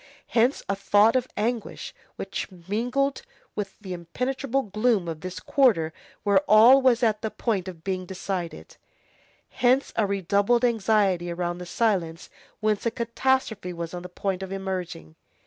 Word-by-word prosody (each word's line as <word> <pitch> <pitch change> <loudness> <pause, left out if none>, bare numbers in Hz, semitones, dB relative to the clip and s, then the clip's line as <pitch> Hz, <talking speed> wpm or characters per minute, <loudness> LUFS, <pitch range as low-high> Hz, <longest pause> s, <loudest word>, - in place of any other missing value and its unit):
Hence 240 +4 +2
a 200 - 0
thought 205 +3 +4
of 255 -1 +1
anguish 230 +2 -3 0.2
which 195 - -4 0.2
mingled 245 - 0 0.3
with 200 -2 -4
the 190 -4 -6
impenetrable 255 - -2
gloom 215 -2 +1
of 160 -2 -5
this 185 -1 -6
quarter 165 - +2 0.3
where 200 -2 +4
all 235 +6 +8
was 255 -2 +3
at 215 -2 +2
the 220 - -2
point 205 -5 -2
of 170 -3 -9
being 185 -1 -3
decided; 185 -2 -5 0.7
hence 255 +2 +2
a 215 -3 +2
redoubled 200 +5 +2
anxiety 205 -6 +2
around 175 0 -3
that 180 - -7
silence 175 -6 -1 0.3
whence 215 -1 +1
a - - +4
catastrophe 230 -3 -1
was 170 0 -6
on 175 - -5
the 180 - -9
point 190 +1 -3
of 190 0 -6
emerging. 185 - -5
200 Hz, 150 wpm, -25 LUFS, 180-235 Hz, 0.7 s, all